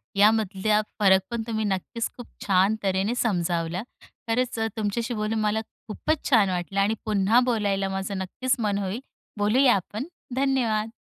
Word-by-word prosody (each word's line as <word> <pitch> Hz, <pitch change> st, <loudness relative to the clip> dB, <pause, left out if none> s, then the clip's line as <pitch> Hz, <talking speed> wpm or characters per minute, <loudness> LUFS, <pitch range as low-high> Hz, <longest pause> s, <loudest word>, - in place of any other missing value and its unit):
यामधला 210 Hz, 0 st, +3 dB, 0.2 s
फरक 190 Hz, -2 st, +5 dB
पण 235 Hz, -1 st, -2 dB
तुम्ही 220 Hz, -1 st, -1 dB
नक्कीच 205 Hz, +4 st, -2 dB
खूप 245 Hz, -, -9 dB, 0.2 s
छान 195 Hz, +2 st, +3 dB
तऱ्हेने 195 Hz, +4 st, 0 dB
समजावला. 175 Hz, -4 st, 0 dB, 0.4 s
खरंच 240 Hz, +1 st, 0 dB
अ, 225 Hz, -, +1 dB
तुमच्याशी 225 Hz, +3 st, -1 dB
बोलून 215 Hz, 0 st, -1 dB
मला 215 Hz, +1 st, +1 dB, 0.3 s
खूपच 300 Hz, +8 st, -2 dB
छान 220 Hz, -8 st, +5 dB
वाटलं 180 Hz, +2 st, -2 dB
आणि 200 Hz, +2 st, +3 dB
पुन्हा 210 Hz, +2 st, +3 dB
बोलायला 200 Hz, -5 st, 0 dB
माझं 195 Hz, +1 st, -3 dB
नक्कीच 250 Hz, +7 st, -1 dB
मन 210 Hz, -3 st, 0 dB
होईल. 200 Hz, +2 st, -2 dB, 0.4 s
बोलूया 240 Hz, +5 st, +4 dB
आपण. 210 Hz, -, -4 dB, 0.3 s
धन्यवाद! 240 Hz, -5 st, +1 dB
210 Hz, 145 wpm, -25 LUFS, 195-230 Hz, 0.4 s, फरक